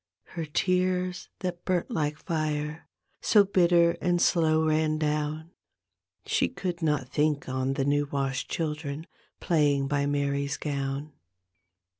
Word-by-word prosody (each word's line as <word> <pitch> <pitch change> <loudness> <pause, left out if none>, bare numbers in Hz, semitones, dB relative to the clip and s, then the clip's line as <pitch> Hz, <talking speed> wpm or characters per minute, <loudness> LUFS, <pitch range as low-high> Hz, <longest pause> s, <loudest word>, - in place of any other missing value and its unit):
Her 165 -2 -4
tears 180 +2 0
that 180 -2 -4
burnt 180 -2 -1
like 150 -1 -1
fire 155 -1 -3 0.3
So 210 -2 +5
bitter 175 -3 +4
and 175 -1 +2
slow 160 -2 +3
ran 155 0 +2
down 155 +1 -2 0.7
She - - +1
could 180 -3 -4
not 150 -5 0
think 150 0 0
on 130 +1 -1
the 135 - 0
new 145 +1 +1
washed 135 -1 -2
children 150 -1 -3 0.3
Flaying 145 -5 +2
by 140 0 0
Mary's 140 0 0
gown. 140 0 -3
155 Hz, 125 wpm, -27 LUFS, 145-170 Hz, 0.7 s, So